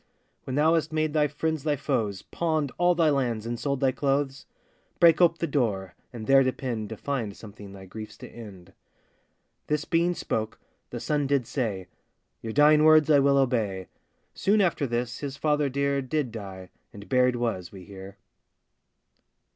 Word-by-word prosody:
'When 130 - -4
thou 155 +3 +4
hast 160 -2 0
made 155 -1 0
thy 150 -1 +3
friends 155 +1 -2
thy 150 -2 +1
foes, 115 -9 -2
Pawned 155 -5 -1
all 175 0 +4
thy 165 -3 +3
lands, 120 -6 -1
and 120 0 -4
sold 140 -2 -2
thy 135 -1 +3
clothes; 135 0 -1 0.5
Break 170 -1 +6
ope 170 -1 +4
the 170 - -1
door, 110 - -1 0.2
and 115 -3 -7
there 135 +2 +6
depend 125 -5 -2
To 110 - -7
find 120 -8 -3
something 105 -2 -11
thy 95 -1 -11
griefs 110 +2 -9
to 125 - -10
end.' 100 -8 -12 0.9
This 150 0 -1
being 170 +1 +1
spoke, 110 -7 -3 0.3
the - - -6
son 145 -2 -1
did 140 -3 +1
say, 105 -9 -3 0.6
'Your 115 - -5
dying 150 +3 +5
words 155 -1 +6
I 145 - +6
will 140 0 +3
obey.' 110 -8 0 0.4
Soon 210 +2 +2
after 170 -7 +1
this 120 0 -3
his 140 -1 -5
father 150 -2 +1
dear 140 +1 0
Did 135 -1 -2
die, 95 -4 -9 0.2
and 100 0 -12
buried 125 -1 +3
was, 115 -7 -3
we 95 -2 -11
hear. 95 0 -11
135 Hz, 170 wpm, -26 LUFS, 110-150 Hz, 0.9 s, Break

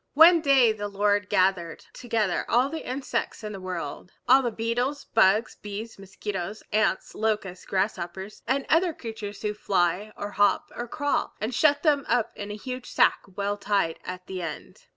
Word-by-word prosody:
One 330 +2 +8
day 270 -6 +5
the 205 -1 -4
Lord 205 0 +1
gathered 185 -3 +1
together 225 -6 -1
all 250 +3 +3
the 320 -3 -6
insects 260 -3 -3
in 210 - -4
the 195 - -7
world, 185 0 -5 0.2
all 270 - +7
the 245 - 0
beetles, 240 +6 -2
bugs, 215 +1 +3
bees, 210 +1 -7
mosquitoes, 195 0 -5
ants, 215 -2 +1
locusts, 210 -4 -2
grasshoppers, 190 0 -3
and 265 +2 +1
other 335 +1 +3
creatures 215 -3 -7
who 210 0 0
fly 195 0 0
or 205 0 -5
hop 205 0 +2
or 240 - -4
crawl, 290 +4 -1
and 220 +4 -2
shut 290 +3 +3
them 290 -4 +3
up 235 -1 +2
in 205 0 -6
a 205 - -4
huge 250 +3 -6
sack - - +4 0.2
well 205 0 -1
tied 200 -5 0
at 185 0 -7
the 185 -2 -5
end. 160 -3 -8
210 Hz, 170 wpm, -26 LUFS, 195-245 Hz, 0.2 s, One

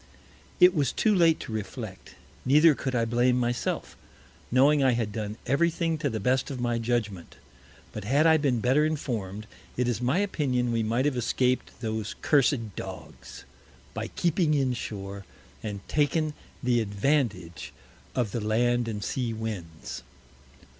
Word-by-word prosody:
It 180 0 +7
was 140 -5 +1
too 215 - +2
late 170 -4 +4
to 120 - -7
reflect; 105 -3 -6 0.3
neither 150 +4 +6
could 130 -2 -3
I 115 -1 +2
blame 120 +2 +2
myself, 120 0 -2 0.5
knowing 140 +3 +4
I 130 -2 +4
had 115 -3 -1
done 105 0 -4
every 140 +7 +3
thing 165 -1 -1
to 150 -2 0
the 110 -3 -3
best 125 +5 +1
of 135 -3 -5
my 120 -1 0
Judgment: 110 -6 -2 0.6
But 105 -2 -6
had 140 +8 +3
I 160 -1 +6
been 135 -6 +1
better 130 +6 +3
inform'd, 110 -10 -3 0.3
it 125 0 +1
is 120 -1 -1
my 125 +7 +1
Opinion 135 -11 0
we 115 -1 +1
might 115 +4 0
have 145 -3 +1
escaped 125 +1 0
those 110 -2 -3
cursed 125 -7 +2
Dogs, - - -9 0.5
by - - -4
keeping 170 -2 +1
in 135 -3 +1
Shore, 100 -4 -6 0.4
and 100 -3 -6
taken 150 +1 +1 0.3
the 120 -1 +2
Advantage 100 - -1 0.4
of 120 -5 0
the 115 - -2
Land 120 +3 +1
and 105 -3 -4
Sea 120 -1 -2
Winds. 100 -8 -6
125 Hz, 155 wpm, -27 LUFS, 110-145 Hz, 0.6 s, It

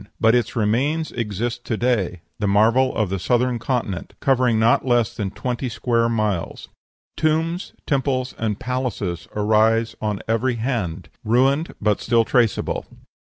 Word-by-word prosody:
But 115 0 +4
its 120 -1 +1
remains 130 +9 0
exist 120 +2 -3
to 110 - -2
day, 105 -8 0 0.2
the 105 - 0
marvel 115 +6 +3
of 105 -5 0
the 95 - -1
Southern 125 +3 +1
Continent, 115 -7 -3
covering 125 -4 +2
not 115 +2 +3
less 120 -3 +1
than 100 -3 -2
twenty 125 +5 -3
square 115 +1 +1
miles. 105 -6 -2 0.5
Tombs, 165 +3 0
temples, 130 -2 0
and 105 -2 -1
palaces 115 -9 -3
arise 110 +2 +2
on 105 -2 -2
every 115 +3 +1
hand, 110 -8 -3
ruined 135 +8 +2
but 105 -1 +1
still 115 -1 +2
traceable. 120 -3 +1
115 Hz, 140 wpm, -22 LUFS, 105-125 Hz, 0.5 s, But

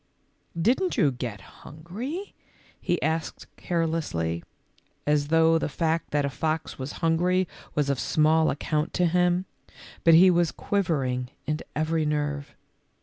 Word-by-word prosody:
"Didn't 260 - +1
you 145 - +4
get 120 -5 -5 0.2
hungry?" 225 - -7 0.5
he 175 - 0
asked 160 +1 -2
care 170 -2 -1
lessly, 85 - -2 0.6
as 150 -1 +2
though 165 +1 +4
the - - -2
fact 160 +3 -1
that 145 -1 +1
a - - 0
fox 155 +2 -2
was 130 +2 -5
hun 165 0 +3
gry 180 +2 +2 0.3
was 150 -2 +1
of 140 -3 0
small 155 +1 +3
account 150 +2 -2
to 180 - +3
him, 180 +1 +2 0.6
but 165 -1 +7
he 185 +3 +8
was 175 -2 +2
quivering 135 -11 -1 0.2
in 150 +1 -1 0.2
every 155 +1 0
nerve 145 -1 -2
160 Hz, 145 wpm, -26 LUFS, 145-175 Hz, 0.6 s, he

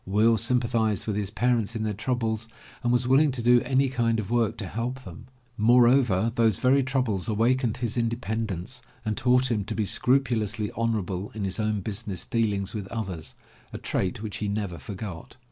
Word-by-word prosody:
Will 110 +4 +4
sympathized 115 -3 +1
with 105 - -2
his 100 -2 -1
parents 115 0 0
in 110 - -2
their 110 -1 -1
troubles 110 0 -2 0.3
and 120 -1 +1
was 125 0 +2
willing 140 +4 +5
to 120 -3 -4
do 120 0 +5
any 135 +1 +2
kind 120 -3 0
of 105 0 -5
work 120 -3 +1
to 105 - -5
help 120 +6 -4
them. 90 +3 -11 0.3
Moreover, 120 -2 +4
those 115 -4 +3
very 135 +2 +3
troubles 125 -8 -1
awakened 115 +2 +1
his 120 -1 -2
independence 115 -1 -2 0.2
and 110 -1 -1
taught 125 0 +3
him 105 -3 0
to - - -4
be 110 - 0
scrupulously 110 -1 +1
honorable 105 -4 -1
in 105 - -3
his 95 +2 -2
own 110 -1 0
business 100 -2 -3
deal 115 -3 +1
ings 100 -1 -3
with 105 -3 -5
others, 95 -8 -5 0.4
a - - -5
trait 95 +3 -2
which 105 -2 -4
he 105 - -2
never 100 -5 -3
forgot. 95 +2 -7
110 Hz, 185 wpm, -26 LUFS, 105-120 Hz, 0.4 s, willing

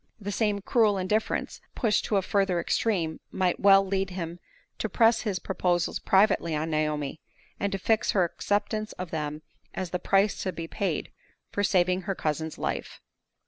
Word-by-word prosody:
The 205 -1 -4
same 205 -1 0
cruel 215 -1 +3
indifference, 210 +4 -1
pushed 220 -3 +1
to 210 - 0
a 195 - +1
further 195 -2 +1
extreme, 170 -4 0
might 180 -2 0
well 195 0 +6
lead 195 0 -1
him 175 -2 -5 0.4
to - - -1
press 225 -1 +4
his 205 -5 -1
proposals 180 -2 0
privately 190 -5 +3
on 155 +2 -2
Naomi, 150 -1 -1 0.4
and 200 - -1
to 195 - -1
fix 220 +3 +1
her 190 - +4
acceptance 210 +4 -1
of 180 -2 -7
them 150 -1 -3 0.3
as 185 -3 -4
the 180 - -1
price 195 +3 +2
to 185 - -1
be 165 -1 -6
paid 180 -2 -2 0.4
for 205 - -1
saving 185 -2 +2
her 195 - 0
cousin's 160 0 -2
life. - - -4
190 Hz, 170 wpm, -27 LUFS, 170-205 Hz, 0.4 s, well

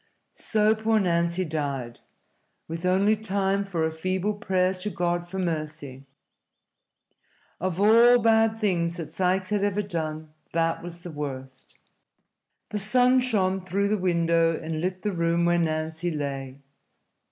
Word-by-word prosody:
So 215 -1 +2
poor 220 0 +1
Nancy 170 -1 +1
died, 140 -6 -4 0.7
with 165 +2 -4
only 195 +4 +3
time 200 -2 0
for 175 -5 -2
a 160 - -1
feeble 185 +5 -1
prayer 185 -2 0
to 185 +2 -5
God 175 -1 -2
for 190 - -6
mercy. 155 -6 -4 1.5
Of 185 0 -2
all 230 +4 +6
bad 225 -1 +3
deeds 175 -5 0
that 165 -3 -6
Sikes 185 +1 0
had 205 -1 +1
ever 205 0 0
done, 155 -4 -5 0.2
that 165 0 0
was 175 0 -9
the 175 - -7
worst. 135 -3 -7 0.9
The 210 - -3
sun 250 +5 +3
shone 195 -7 +1
through 200 +2 0
the 215 - +2
window 170 -2 +2
and 160 -1 -4
lit 185 +1 -3
the 210 - 0
room 170 0 +1
where 175 0 +3
Nancy 160 +1 -1
lay. 140 -4 -4
175 Hz, 140 wpm, -26 LUFS, 160-200 Hz, 1.5 s, all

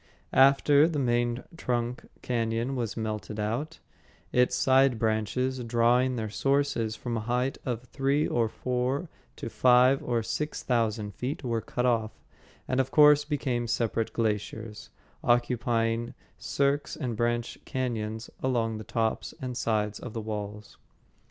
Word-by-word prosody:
After 140 +3 +6
the 165 -3 -2
main 120 -2 0
trunk 120 -4 -2 0.2
cañon 115 +1 -1
was 120 -5 -3
melted 110 -1 -4
out, 120 +10 -2 0.5
its 125 0 +3
side 130 0 +4
branches, 115 +4 0
drawing 120 +2 +2
their 110 -2 -2
sources 125 -2 0
from 115 +2 -3
a 110 +1 -5
height 125 +2 0
of 120 -1 -2
three 135 +3 0
or 115 -2 +1
four 130 +7 -2 0.3
to - - -6
five 125 +3 +4
or 120 -2 -1
six 120 +7 -3
thousand 110 -4 0
feet, 130 +7 -4
were 115 -3 -1
cut 125 +3 -2
off, 115 -3 +1 0.5
and 130 - 0
of 130 0 +1
course 150 0 +6
became 130 -5 -1
separate 115 -1 -1
glaciers, 110 0 -3 0.3
occupying 120 -1 +1 0.2
cirques 140 +1 0
and 125 -6 -3
branch 120 +1 -1
cañons 115 -3 -3
along 115 -4 0
the - - -7
tops 110 +1 -2
and 125 -1 -4
sides 105 -3 -1
of 125 - -8
the 115 - -3
walls. 105 -1 -6
120 Hz, 140 wpm, -28 LUFS, 115-130 Hz, 0.5 s, After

